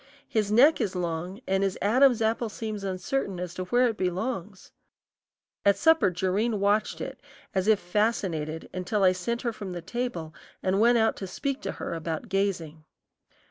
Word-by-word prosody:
His 210 -2 0
neck 270 +9 +6
is 190 -3 -1
long 175 +4 -3
and 190 0 +1
his 195 -1 0
Adam's 245 +2 +4
apple 225 +1 0
seems 215 -1 -5
uncertain 190 +1 -2
as 180 -1 -4
to 185 0 -4
where 245 +6 +3
it 225 -2 -2
belongs. 190 +1 -3 0.9
At 200 0 +4
supper 320 -4 +4
Jerrine 195 +5 0
watched 205 +2 +1
it - - -6 0.3
as 190 +1 0
if 215 -2 +5
fascinated 175 -6 -1
until 185 +3 -1
I 185 - +6
sent 235 +6 -3
her 235 -2 -1
from 200 -4 -6
the 175 - -5
table 190 -6 -4 0.3
and 190 +1 +1
went 235 +2 +5
out 225 -1 +3
to 195 - -5
speak 275 +8 -3
to - - -3
her - - -5
about 165 +7 -4
gazing. 175 -6 -1
200 Hz, 175 wpm, -27 LUFS, 180-225 Hz, 0.9 s, neck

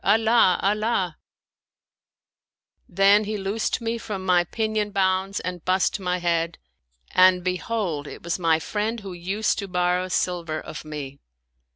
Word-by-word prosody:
Allah! 220 -2 +4
Allah! 200 -4 0 0.8
" - - -52
Then 200 +3 +4
he 215 +1 -3
loosed 200 +4 -2
me 230 0 -2
from 195 -4 -5
my 180 -1 +4
pinion 215 +2 -1
bonds 190 0 0
and 180 -2 -5
bussed 185 +2 +1
my 180 -1 -1
head, 170 -1 0 0.5
and 185 -1 +5
behold 180 -4 -2
it - - -10
was 170 +2 -2
my 165 -2 +3
friend 215 +7 -3
who 195 -2 -7
used 190 +6 -1
to 200 - -4
borrow 180 0 0
silver 175 -3 -1
of - - -8
me. 145 -3 -7
185 Hz, 145 wpm, -24 LUFS, 175-210 Hz, 0.8 s, and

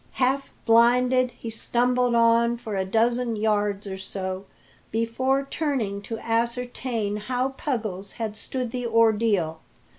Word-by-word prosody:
Half 270 +2 0
blinded, 250 +2 +4
he 230 -1 -8
stumbled 245 +2 +1
on 235 0 +4
for 220 -3 -5
a 190 - +1
dozen 235 +3 +1
yards 210 -1 0
or 190 -1 -5
so 190 0 -5 0.4
before 260 +5 0
turning 255 -11 -2
to 225 +3 -5
ascertain 235 -2 -1
how 250 +5 -1
Puggles 215 -8 -4
had 220 -2 -4
stood 250 +2 -4
the 245 -1 -3
ordeal. 220 -8 +2
230 Hz, 125 wpm, -25 LUFS, 210-250 Hz, 0.4 s, blinded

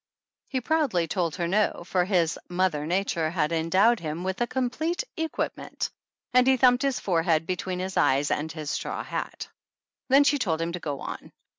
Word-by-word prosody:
He 260 -2 -2
proudly 275 - +1
told 170 -1 -1
her 175 -2 -1
no, 205 -1 +1
for 180 -1 +1
his 175 -4 +1
"Mother 175 -5 0
Nature 170 -3 0
had 160 -2 0
endowed 185 +8 +3
him 160 +1 -4
with 190 +4 -3
a 240 - +2
com 255 0 -1
plete 330 - -1
equipment," 320 0 -3 0.4
and 250 0 +5
he 265 0 +5
thumped 245 0 +5
his 275 -2 0
forehead 165 -3 +1
between 185 +1 -3
his 185 +1 -4
eyes 140 +2 +3
and 155 +2 -1
his 155 -2 -5
straw - - -3
hat. - - -5 0.6
Then 275 +2 +7
she 285 0 +3
told 165 -9 0
him 165 +1 -1
to 175 - -4
go 145 -4 -4
on. - - -7
185 Hz, 185 wpm, -26 LUFS, 165-245 Hz, 0.6 s, Then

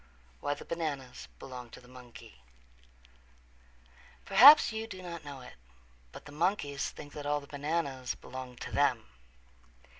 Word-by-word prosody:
XII - - -30
Why 145 - -1
the - - -11
Bananas 145 -7 -5
Belong 125 -2 -9
to - - -12
the 125 - -18
Monkey 125 -1 -14 1.8
Perhaps 290 +3 +9
you 220 0 -4
do 185 -4 -9
not 170 -2 -7
know 140 -2 -9
it, 125 - -12 0.6
but - - -12
the 145 - -11
monkeys 145 -3 -1
think 145 0 -11
that 145 -1 -6
all 145 0 +1
the 140 - -13
bananas 140 -3 -3
belong 130 -1 -9
to - - -8
them. - - +1
145 Hz, 150 wpm, -31 LUFS, 125-170 Hz, 1.8 s, Perhaps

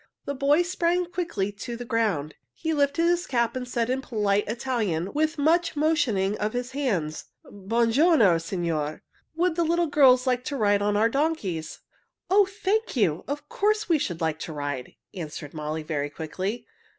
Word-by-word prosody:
The 280 - -2
boy 285 +5 +3
sprang 355 0 0
quickly 330 - -2
to 235 +4 -7
the 245 - -7
ground. 205 -11 0 0.2
He 320 - -2
lifted 285 +2 +1
his 350 +1 +1
cap 235 -2 0
and 250 -1 -4
said 235 -2 -1
in 260 +2 -1
polite 205 -5 0
Italian, 215 -7 -2
with 310 +1 0
much 325 +4 +2
motioning 260 -11 +1
of 210 +1 -1
his 245 +1 -3
hands, 200 - -2 0.2
"Buon 225 +4 0
giorno, 245 - +5
signore. 165 -3 -3 0.3
Would 345 0 +1
the 340 - +2
little 340 +1 +2
girls 270 -4 +5
like 250 -1 +1
to 285 - -3
ride 205 -3 +3
on 205 0 +1
our 220 +2 +4
donkeys?" 230 - -2 0.5
"Oh, 400 0 +6
thank 420 +1 -1
you! 180 -9 +1
Of 290 +2 -4
course 425 +4 0
we 330 -3 +3
should 175 - -3
like 160 -1 -1
to 160 - -6
ride," 145 -3 -5 0.2
answered 155 -4 -7
Molly 155 0 -4
very 145 -2 -2
quickly. 185 +9 -4
240 Hz, 175 wpm, -26 LUFS, 185-310 Hz, 0.5 s, Oh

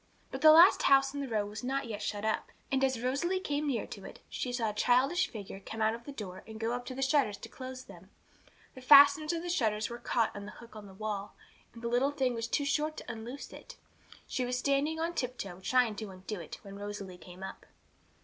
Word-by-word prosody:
But - - -5
the 310 - +9
last 335 +5 +8
house 270 0 +5
in 285 - -3
the 275 - -3
row 215 -4 0
was 210 +4 -7
not 270 +2 -1
yet 215 -2 -5
shut 210 0 -3
up, 220 - -1 0.2
and 270 0 +2
as 260 -3 +1
Rosalie 310 +9 0
came 295 -4 -2
near 255 -5 0
to - - -9
it, - - -10
she 250 - -3
saw 230 -3 0
a - - -11
childish 260 - +3
figure 200 -3 -8
come 220 +3 -8
out 220 0 +3
of 235 +1 -8
the 285 - -6
door 190 -8 -7
and 220 0 -9
go 225 +1 -1
up 245 0 -4
to 255 - -5
the 270 - -1
shutters 265 -7 +2
to - - -10
close 255 0 -8
them. - - -14 0.6
The 260 - -11
fasteners 285 +3 +8
of 335 0 -3
the - - -5
shutters 220 -10 +1
had 235 0 -8
caught 230 -2 +1
in 205 0 -7
the 210 - -9
hook 235 -2 -14
on 210 -1 -9
the 190 - -13
wall, 205 -1 -4 0.4
and 230 - -11
the - - -1
little 245 +4 +2
thing 265 -3 0
was 230 -1 -3
too 285 +4 0
short 305 +2 0
to - - -6
unloose 235 +5 -8
it. - - -11 0.5
She 255 - -2
was 250 0 -1
standing 280 +4 +1
on 335 +1 -1
tiptoe, 235 - -4
trying 245 +2 +2
to 215 -1 -5
undo 190 +2 -7
it, 165 - -8
when 200 0 -9
Rosalie 205 -3 -6
came 180 +1 -11
up. 190 - -8
245 Hz, 245 wpm, -31 LUFS, 210-275 Hz, 0.6 s, the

